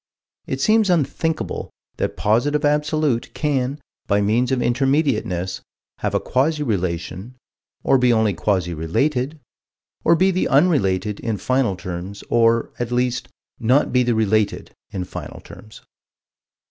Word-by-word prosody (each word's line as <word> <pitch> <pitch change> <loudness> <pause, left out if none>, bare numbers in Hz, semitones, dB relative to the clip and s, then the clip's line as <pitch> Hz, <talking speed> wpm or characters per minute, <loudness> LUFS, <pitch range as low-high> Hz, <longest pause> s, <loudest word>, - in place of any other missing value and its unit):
It - - -3
seems 215 -1 +3
thinkable 160 -1 -1 0.3
that - - -2
the - - -9
Positive 145 +8 +2
Absolute 150 -3 0
can, 140 -2 -1 0.3
by 100 0 +2
means 115 +6 +1
of 130 - +2
Intermediateness, 120 - 0 0.4
have - - -2
a - - +3
quasi 150 +4 0
relation, 95 - -3 0.5
or 135 - +4
be 125 -1 +4
only 110 -3 +2
quasi 90 -1 0
related, 130 - -1 0.6
or 170 - +5
be 190 +3 +3
the 185 - 0
unrelated, 105 - +2
in 115 -3 -2
final 130 -3 +1
terms, 90 +2 -7
or, 115 0 +3
at 120 0 -3
least, 125 0 0 0.3
not 125 +5 +2
be 125 - +4
the 120 -2 +1
related, 110 -1 0 0.2
in 95 - -4
final - - -8
terms. 110 0 -14
120 Hz, 135 wpm, -21 LUFS, 100-145 Hz, 0.6 s, or